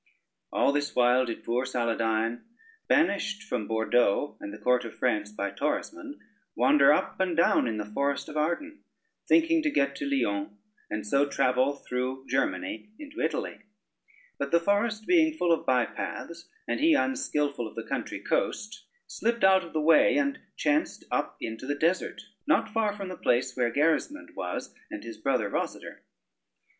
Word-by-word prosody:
All -, -, +3 dB
this 145 Hz, 0 st, -2 dB
while 125 Hz, +1 st, +4 dB
did 115 Hz, -2 st, -6 dB
poor 120 Hz, +2 st, 0 dB
Saladyne, 115 Hz, -2 st, 0 dB, 0.5 s
banished 215 Hz, -7 st, +1 dB
from 105 Hz, -, -3 dB
Bordeaux 110 Hz, +3 st, +1 dB
and 100 Hz, -, -7 dB
the 105 Hz, -, -8 dB
court 125 Hz, +1 st, +2 dB
of 115 Hz, -, -8 dB
France 105 Hz, -5 st, 0 dB
by 100 Hz, -1 st, -3 dB
Torismond, 285 Hz, -, -3 dB, 0.4 s
wander 295 Hz, +2 st, +5 dB
up -, -, 0 dB
and 180 Hz, -3 st, 0 dB
down 170 Hz, -, +4 dB
in 110 Hz, -2 st, -2 dB
the 105 Hz, -, -3 dB
forest 140 Hz, +7 st, -1 dB
of -, -, -9 dB
Arden, 170 Hz, -, -2 dB, 0.4 s
thinking 330 Hz, 0 st, +4 dB
to 305 Hz, -, +1 dB
get 140 Hz, -, +1 dB
to 140 Hz, -, -3 dB
Lyons, 105 Hz, -7 st, -1 dB, 0.4 s
and 105 Hz, 0 st, -4 dB
so 140 Hz, +6 st, +2 dB
travel 130 Hz, 0 st, +2 dB
through 130 Hz, 0 st, -4 dB
Germany 205 Hz, -, -2 dB
into 300 Hz, +1 st, -8 dB
Italy: -, -, -2 dB, 0.8 s
but 140 Hz, -, -2 dB
the 170 Hz, -, +4 dB
forest 210 Hz, +4 st, 0 dB
being 320 Hz, -3 st, +3 dB
full 175 Hz, -, +1 dB
of 165 Hz, -, +1 dB
by 125 Hz, -2 st, +3 dB
paths, 170 Hz, 0 st, -7 dB, 0.2 s
and -, -, -1 dB
he 315 Hz, +1 st, +5 dB
unskilful 150 Hz, -, 0 dB
of -, -, -13 dB
the -, -, -4 dB
country -, -, -3 dB
coast, 215 Hz, +2 st, -2 dB, 0.2 s
slipped 235 Hz, +1 st, -2 dB
out 190 Hz, 0 st, +6 dB
of 170 Hz, -, -10 dB
the 155 Hz, -, -1 dB
way, 160 Hz, -, +5 dB
and 285 Hz, 0 st, 0 dB, 0.2 s
chanced 300 Hz, +2 st, 0 dB
up -, -, -1 dB
into 115 Hz, +3 st, -6 dB
the 145 Hz, -, 0 dB
desert, 165 Hz, +5 st, 0 dB, 0.2 s
not -, -, +2 dB
far 220 Hz, -2 st, +1 dB
from 195 Hz, -2 st, -5 dB
the 185 Hz, -, -5 dB
place 130 Hz, +1 st, +1 dB
where 120 Hz, -2 st, +1 dB
Gerismond 165 Hz, -, 0 dB
was, 90 Hz, -, -4 dB, 0.2 s
and -, -, -7 dB
his 115 Hz, -2 st, -8 dB
brother 125 Hz, -3 st, +1 dB
Rosader. -, -, -4 dB
140 Hz, 170 wpm, -28 LUFS, -, 0.8 s, out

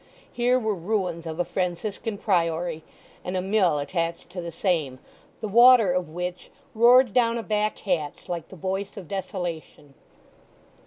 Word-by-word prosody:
Here 245 Hz, +1 st, +2 dB
were 220 Hz, -4 st, 0 dB
ruins 180 Hz, -3 st, -2 dB
of 160 Hz, +1 st, -6 dB
a 175 Hz, -, +1 dB
Franciscan 195 Hz, +4 st, -3 dB
priory, 170 Hz, -4 st, 0 dB, 0.4 s
and 185 Hz, +1 st, -3 dB
a -, -, +1 dB
mill 190 Hz, -5 st, +2 dB
attached 165 Hz, +3 st, -3 dB
to 180 Hz, 0 st, -5 dB
the 170 Hz, 0 st, -6 dB
same, 160 Hz, -7 st, -1 dB, 0.4 s
the 220 Hz, -, -2 dB
water 235 Hz, -1 st, +7 dB
of 180 Hz, -2 st, -1 dB
which 180 Hz, +2 st, -5 dB, 0.2 s
roared 240 Hz, 0 st, +6 dB
down 235 Hz, -2 st, +3 dB
a 230 Hz, -, -4 dB
back 215 Hz, 0 st, 0 dB
hatch 165 Hz, -6 st, -3 dB
like 170 Hz, -3 st, -4 dB
the -, -, -12 dB
voice 190 Hz, +4 st, -4 dB
of 190 Hz, -5 st, -8 dB
desolation. 175 Hz, -6 st, -5 dB
185 Hz, 155 wpm, -25 LUFS, 170-215 Hz, 0.4 s, water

